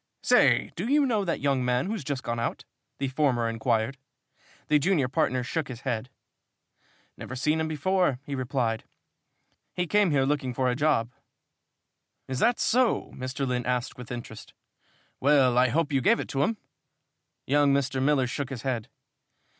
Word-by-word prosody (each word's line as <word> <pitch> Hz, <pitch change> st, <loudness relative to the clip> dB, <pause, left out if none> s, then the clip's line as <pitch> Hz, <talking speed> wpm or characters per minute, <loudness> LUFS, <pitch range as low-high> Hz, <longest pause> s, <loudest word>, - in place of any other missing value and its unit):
"Say, -, -, +4 dB
do -, -, -3 dB
you 290 Hz, 0 st, +4 dB
know 220 Hz, -6 st, +1 dB
that 170 Hz, -3 st, -2 dB
young 135 Hz, -2 st, +1 dB
man 125 Hz, +1 st, +1 dB
who's 205 Hz, -3 st, -3 dB
just 140 Hz, -1 st, -3 dB
gone 120 Hz, 0 st, -2 dB
out?" 115 Hz, -, -3 dB, 0.3 s
the 140 Hz, -, -1 dB
former 130 Hz, -4 st, +1 dB
inquired. 115 Hz, +2 st, -1 dB, 0.7 s
The 150 Hz, 0 st, +4 dB
junior 155 Hz, -4 st, +2 dB
partner 125 Hz, 0 st, 0 dB
shook 155 Hz, +4 st, -2 dB
his 125 Hz, -2 st, -8 dB
head. 125 Hz, -1 st, -3 dB, 1.1 s
"Never 130 Hz, -, -7 dB
seen 150 Hz, +5 st, +1 dB
him 160 Hz, -, 0 dB
before," 165 Hz, -1 st, +1 dB
he 145 Hz, -, -5 dB
replied. 125 Hz, -4 st, -1 dB, 0.9 s
"He 180 Hz, -, 0 dB
came 205 Hz, +2 st, +3 dB
here 140 Hz, -3 st, +2 dB
looking 135 Hz, -3 st, -1 dB
for 130 Hz, -1 st, +1 dB
a -, -, -1 dB
job." 135 Hz, -5 st, +1 dB, 1.2 s
"Is 130 Hz, -1 st, -3 dB
that 240 Hz, +1 st, +2 dB
so?" 250 Hz, -1 st, +1 dB
Mr. 130 Hz, +1 st, -3 dB
Lynn 125 Hz, -1 st, -2 dB
asked 125 Hz, -1 st, -1 dB
with 125 Hz, -1 st, -10 dB
interest. 120 Hz, -3 st, -8 dB, 0.6 s
"Well, 135 Hz, -3 st, +4 dB
I 125 Hz, +1 st, +5 dB
hope 150 Hz, +3 st, 0 dB
you 135 Hz, -, +2 dB
gave 225 Hz, -, +3 dB
it -, -, -5 dB
to 135 Hz, -, -1 dB
him?" 225 Hz, +9 st, +1 dB, 0.9 s
Young 145 Hz, +1 st, +3 dB
Mr. 140 Hz, -1 st, 0 dB
Miller 135 Hz, -1 st, +3 dB
shook 130 Hz, +2 st, -4 dB
his 130 Hz, -4 st, -6 dB
head. 125 Hz, -5 st, -2 dB
135 Hz, 170 wpm, -27 LUFS, 125-150 Hz, 1.2 s, I